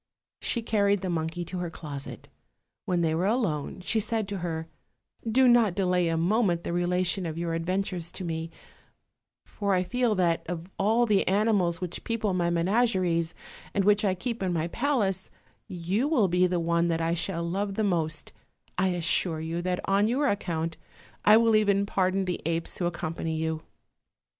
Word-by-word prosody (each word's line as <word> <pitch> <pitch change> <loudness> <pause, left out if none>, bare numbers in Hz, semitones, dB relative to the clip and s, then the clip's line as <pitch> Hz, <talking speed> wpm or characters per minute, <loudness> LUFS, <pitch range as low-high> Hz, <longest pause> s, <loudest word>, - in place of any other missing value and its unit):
She 235 - -1
carried 205 -3 +2
the 185 - -2
monkey 165 +1 -2
to 180 +2 -5
her 175 -1 -3
closet. 145 -4 -7 0.6
When 175 -1 +1
they 160 -1 +1
were 175 +4 +1
alone 190 - -1
she 220 +4 0
said 220 -1 -1
to 200 -2 -3
her: 165 -2 -3 0.6
"Do 260 +3 +5
not 235 -6 +5
delay 180 -3 +2
a 165 0 0
moment 175 0 +2
the - - -3
rela 175 +1 +1
tion 180 0 -1
of 160 0 -5
your 170 -1 -2
adventures 175 0 -2
to 190 - -4
me; 165 0 -3 1.0
for 200 -2 -1
I 180 - +2
feel 240 +3 +1
that 170 -3 +1
of 170 -1 -4
all 220 +4 +3
the 210 -4 +2
animals 190 -4 +2
which 180 -1 -4
people 220 -4 -1
my 175 -1 +1
menageries 175 -2 +1 0.4
and 200 -2 +2
which 210 +1 +4
I 190 -3 +2
keep 230 +4 -4
in 185 -2 0
my 165 0 -1
palace, 210 -7 0 0.4
you 185 +8 -1
will 250 -10 +3
be 180 +1 +3
the 180 -1 0
one 170 0 +1
that 165 -1 0
I 165 0 +1
shall 170 0 -1
love 195 +3 -2
the 220 - 0
most: 165 -6 -1 0.5
I 190 - +3
assure 175 -2 0
you 165 +2 -3
that 180 0 -1
on 200 +2 +3
your 270 +5 +1
account 165 -7 -2 0.5
I 215 +1 +8
will 225 -1 +4
even 200 -2 +3
pardon 190 -1 +1
the 180 -1 -3
apes 165 0 -2
who 175 - +1
accompany 165 -1 -3
you." 160 0 -2
180 Hz, 180 wpm, -27 LUFS, 170-205 Hz, 1.0 s, I